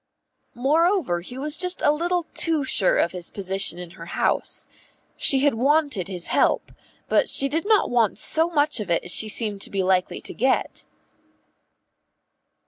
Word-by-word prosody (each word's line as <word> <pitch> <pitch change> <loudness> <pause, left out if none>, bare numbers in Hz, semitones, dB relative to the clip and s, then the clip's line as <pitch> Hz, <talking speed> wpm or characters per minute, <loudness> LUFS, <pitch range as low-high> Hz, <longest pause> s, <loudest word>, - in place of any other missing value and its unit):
Moreover 300 - +1
he 245 +8 -10
was 300 +3 -2
just 360 0 +1
a 290 - +4
little 345 +3 -1
too 320 -4 0
sure 205 -7 +1
of 170 - +1
his 180 -2 -6
position 195 -2 -2
in 175 -1 -9
her 165 -1 -12
house. - - -1 0.5
She 270 -1 +4
had 285 0 +3
wanted 275 - +1
his 180 -3 -4
help, - - +1 0.4
but - - +1
she 275 - +3
did 320 +7 -3
not 430 - +2
want 235 -4 +1
so 325 +2 +2
much 295 -5 +1
of 210 - -6
it 170 - 0
as 175 - 0
she 215 - +2
seemed 210 -2 +1
to - - 0
be 195 -1 -2
likely 185 -1 0
to - - -6
get. 260 +3 -1
255 Hz, 170 wpm, -23 LUFS, 190-310 Hz, 0.5 s, a